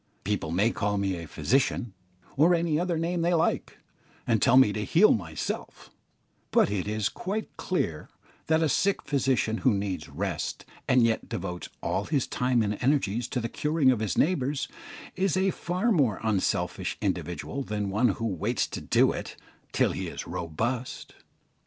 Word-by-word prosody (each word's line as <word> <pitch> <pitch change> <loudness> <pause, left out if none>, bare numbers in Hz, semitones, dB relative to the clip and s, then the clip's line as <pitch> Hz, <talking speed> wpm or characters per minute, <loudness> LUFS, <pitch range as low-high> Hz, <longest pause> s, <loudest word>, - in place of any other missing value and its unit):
People 100 -5 -1
may 100 +8 +2
call 105 -1 -1
me 100 -1 0
a 85 -1 -7
"physician" 120 - 0 0.4
or 165 +5 +5
any 165 -2 +1
other 175 -1 0
name 170 +1 -1
they 175 +1 +2
like, 165 - 0 0.5
and 115 -3 +2
tell 125 - +5
me 130 -6 +6
to 105 - -2
heal 175 - +5
myself; 80 -7 -5 0.6
but - - +3
it 100 -1 -2
is 105 -1 0
quite 205 +4 -4
clear 85 - -2 0.4
that 160 +1 +3
a - - +3
sick 195 +7 +1
physician 130 -5 +1
who 130 - +3
needs 100 -6 -3
rest, 85 +3 -3 0.2
and 130 -1 +5
yet 115 -1 +1
devotes 90 0 -5
all - - -1
his 145 -5 0
time 125 -2 +1
and 105 0 -2
energies 125 -4 +1
to 125 - -2
the 115 - -2
curing 150 +1 +2
of 125 - 0
his 110 -5 -2
neighbours, 145 -4 +1 0.5
is 185 -1 +1
a 190 0 +2
far 180 +8 -1
more 135 - +2
unselfish 110 -4 0
individual 90 - -3
than 105 -5 -3
one 110 +5 +3
who 115 +2 -1
waits 95 -7 0
to - - -6
do - - +3
it - - -6 0.4
till - - +2
he - - -4
is - - -6
robust. 115 +10 -3
120 Hz, 170 wpm, -27 LUFS, 100-155 Hz, 0.6 s, me